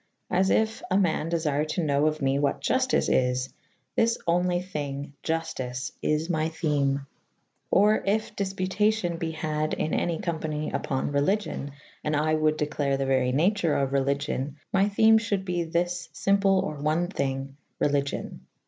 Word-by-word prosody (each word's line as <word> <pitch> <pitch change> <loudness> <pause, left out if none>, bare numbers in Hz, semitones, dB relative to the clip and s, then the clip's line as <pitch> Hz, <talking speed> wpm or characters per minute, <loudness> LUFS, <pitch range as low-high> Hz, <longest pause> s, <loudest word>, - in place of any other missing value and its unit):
As 190 +1 +3
yf 220 0 +1
aman 180 -4 +1
defyre 155 -3 0
to 170 +3 -1
knowe 145 0 +2
of 155 -1 -1
me 135 +1 +2
what 140 -1 0
Juftice 260 0 +1
is 125 0 +1 0.2
/ - - -44
this 230 0 +2
onlv 175 +1 +2
thvnge 145 -5 -4
Juftice 135 -6 -3
is 155 +1 0
my 160 -2 0
theme 145 -4 0 0.3
/ - - -47
Or 210 +2 +5
yf 215 +2 0
difputacyon 195 -1 0
be 165 - -2
had 155 -1 -2
in' 155 - -2
any' 170 -2 0
conipany 160 -5 -3
ypon 135 +1 -2
Relvgion 145 +1 0 0.3
/and 150 0 0
I 155 +1 +1
wold 155 0 +2
declare 145 -2 0
the 135 - -1
very 130 -1 +2
nature 170 +3 +2
of 135 -1 0
Religion 140 +1 -1 0.2
my 195 +1 +3
theme 220 +2 +5
fhulde 200 -3 -2
be 175 -2 -1
thys 175 +2 -1
iVmple 195 -1 +3
or 155 -1 -4
one 155 +4 +1
thynge 135 -6 -2 0.3
Relyg 140 -1 +1
yon. - - -6
155 Hz, 160 wpm, -26 LUFS, 140-185 Hz, 0.3 s, Or